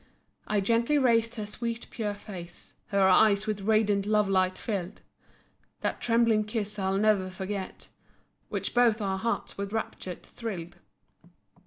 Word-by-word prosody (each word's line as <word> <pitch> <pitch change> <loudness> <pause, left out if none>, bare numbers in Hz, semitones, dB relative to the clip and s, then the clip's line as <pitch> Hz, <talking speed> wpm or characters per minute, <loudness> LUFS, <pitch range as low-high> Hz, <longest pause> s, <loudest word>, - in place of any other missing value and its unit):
I 210 -1 +1
gently 235 +7 +2
raised 230 -3 +3
her 215 -3 -4
sweet, 230 +2 -3
pure 210 -3 -2
face, 180 -4 -9
Her 200 -2 +3
eyes 200 +2 +5
with 210 -2 -2
radiant 205 -1 +2
love 210 -1 +3
light 185 -1 +2
filled. 195 -3 -4 0.8
That - - -2
trembling 230 -2 +3
kiss 210 -1 -3
I'll 190 0 +1
ne'er 205 -3 +3
forget, 190 +1 -5 0.6
Which - - -3
both 240 -2 +4
our 195 -2 -1
hearts 230 -1 -2
with 200 0 -3
rapture 210 -4 -4
thrilled. 175 -7 -7
210 Hz, 140 wpm, -28 LUFS, 195-225 Hz, 0.8 s, eyes